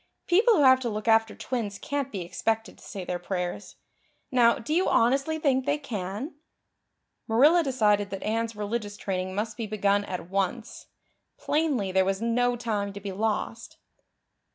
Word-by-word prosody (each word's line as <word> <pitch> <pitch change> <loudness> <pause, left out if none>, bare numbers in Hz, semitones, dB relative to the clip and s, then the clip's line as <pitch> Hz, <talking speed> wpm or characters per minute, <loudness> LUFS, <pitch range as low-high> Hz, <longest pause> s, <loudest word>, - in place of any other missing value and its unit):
People 435 +6 +4
who 295 - +4
have 260 -1 +7
to 245 -2 -2
look 215 +1 -5
after 225 0 +3
twins 220 -6 -3
can't 280 +2 -3
be 195 - -4
expected 225 +6 -2
to - - -17
say 195 -4 -7
their 180 0 -3
prayers. 180 +1 -4 0.6
Now, 240 -2 +4
do 235 +7 -4
you 360 +3 +2
honestly 275 +7 +2
think 270 -3 +1
they 290 +1 +2
can?" 235 - -5 0.9
Marilla 285 +10 +5
decided 210 -8 +2
that 195 -1 -6
Anne's 225 +1 -1
religious 205 0 -4
training 185 -1 -3
must 215 +2 -3
be 230 -2 -3
begun 205 -1 +1
at 180 -3 -5
once. 195 +5 -3 0.5
Plainly 290 -11 0
there 190 0 +3
was 195 0 -1
no 245 +2 +1
time 210 -4 -2
to 200 - -7
be 200 0 -5
lost. 220 +3 -3
225 Hz, 165 wpm, -27 LUFS, 200-260 Hz, 0.9 s, have